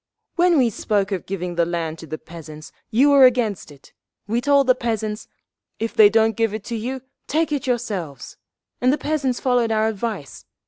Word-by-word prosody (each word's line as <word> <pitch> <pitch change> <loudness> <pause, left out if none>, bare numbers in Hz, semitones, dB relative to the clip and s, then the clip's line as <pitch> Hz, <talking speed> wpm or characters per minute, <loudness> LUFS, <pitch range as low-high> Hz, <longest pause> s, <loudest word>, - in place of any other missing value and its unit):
"When 350 -1 +4
we 245 -4 +3
spoke 205 0 -1
of 190 -3 -3
giving 180 -2 -4
the 170 0 +2
land 165 -2 -3
to 165 - -10
the 155 +1 -5
peasants, 155 -2 -11 0.2
you 265 +6 +4
were 275 -2 +8
against 225 -10 -1
it. 140 -2 -18 0.3
We 230 +4 -1
told 280 +1 +3
the 255 - +5
peasants, 220 -3 -3 0.5
'If 225 0 -3
they 210 -2 +7
don't 225 0 +2
give 225 -1 0
it 215 - -6
to 235 +2 -5
you, 250 +4 -4 0.3
take 315 +2 0
it 290 -1 -2
yourselves!' 205 - -3 0.5
and 255 +1 +4
the 295 - +1
peasants 285 -5 -1
followed 245 -3 +1
our 220 0 +2
advice. 210 - -5
225 Hz, 190 wpm, -21 LUFS, 195-255 Hz, 0.5 s, were